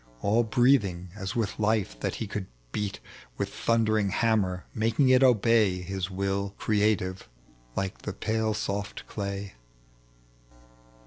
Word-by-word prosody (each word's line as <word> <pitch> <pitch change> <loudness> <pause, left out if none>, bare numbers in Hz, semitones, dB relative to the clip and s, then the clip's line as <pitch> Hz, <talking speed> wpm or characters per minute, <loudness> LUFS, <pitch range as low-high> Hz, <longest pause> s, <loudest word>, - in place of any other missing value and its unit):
All 110 +4 +4
breathing 110 -7 +2
as 95 -1 -5
with 110 -2 -1
life 105 - +1
that - - -2
he - - -3
could 100 -2 -4 0.2
beat 100 +4 -3 0.4
With - - -3
thundering 110 -3 +2
hammer, 95 -4 +1
making 115 +5 +2
it 130 0 +6
obey 115 -6 +4
His 95 0 -3
will 100 +1 -2
creative, 105 - 0 0.5
like 95 -1 -2
the 105 - -5
pale 110 +2 -1
soft 100 -1 -3
clay. 100 -1 -5
105 Hz, 125 wpm, -28 LUFS, 95-110 Hz, 0.5 s, it